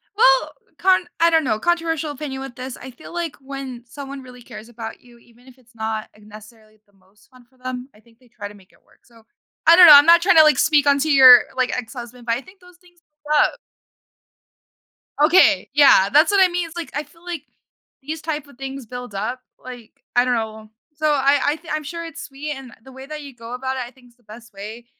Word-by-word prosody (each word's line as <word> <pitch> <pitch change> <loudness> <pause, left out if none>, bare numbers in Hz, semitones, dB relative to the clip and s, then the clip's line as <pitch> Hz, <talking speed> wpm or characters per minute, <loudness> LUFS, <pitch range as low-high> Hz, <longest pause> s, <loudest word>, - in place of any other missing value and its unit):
Well, - - +3 0.3
con 370 -1 +2
I 335 - +4
don't 325 -1 +2
know 215 -5 -1
controversial 325 -1 -1
opinion 280 -2 -7
with 270 -3 -9
this. 255 0 -8
I 260 - -11
feel 255 +7 -14
like 340 -3 -4
when 265 -3 -8
someone 275 +1 -9
really 250 -1 -14
cares 225 -1 -12
about 225 -1 -9
you, 240 -1 -20
even 240 +2 -24
if 255 - -17
it's 245 -2 -27
not 220 -1 -5
necessarily 215 +1 -17
the 205 - -34
most 195 +2 -29
fun 255 -2 -21
for 260 - -32
them, 255 0 -7
I - - -20
think 230 +1 -27
they 250 - -25
try 205 -2 -9
to 205 - -14
make 190 -2 -21
it - - -29
work - - -29
so 230 -2 -22 0.4
I 335 - +8
don't 360 0 +9
know, 310 - +10
I'm 290 +2 +8
not 340 0 +6
tryna, 355 -4 +6
like, 305 -1 +4
speak 295 -2 +2
on 280 0 +4
to 310 +2 0
your, 255 -3 +9
like, 255 -1 0
ex-husband, 240 0 -9
but 230 - 0
I 240 - -3
think 370 +5 -19
those 360 -1 -20
things 355 -1 -26 0.2
build 300 0 +1
up. - - -3 1.7
Okay. 315 -2 +4
Yeah, 275 -9 +5
that's 310 +6 +5
what 395 -1 +5
I - - +5
mean 350 -1 -3
it's 330 +1 -13
like, 330 -6 -6
I 295 - -2
feel 320 +4 -24
like 345 -5 -6 0.6
these 305 +3 -7
type 305 -2 -5
of 280 - -19
things 270 -1 -8
build 245 0 -9
up, 240 +6 -4 0.2
like 245 -3 -11 0.2
I 245 - +4
don't 250 -1 0
know, 220 -1 -6 0.3
so 310 +1 -1
I 280 0 +2
I 290 - +1
thi 320 +1 -20
I'm 305 0 -3
sure 335 +3 -7
it's 325 -3 -9
sweet, 285 +2 -8
and 265 -2 -12
the 265 - -15
way 265 +1 -11
that 305 +1 -8
you 280 -3 -12
go 230 0 -10
about 260 +1 -4
it, 255 - -3
I 240 - -13
think's 245 -2 -23
the 240 - -35
best 225 +2 -15
way. 215 +4 -10
265 Hz, 240 wpm, -20 LUFS, 235-305 Hz, 1.7 s, know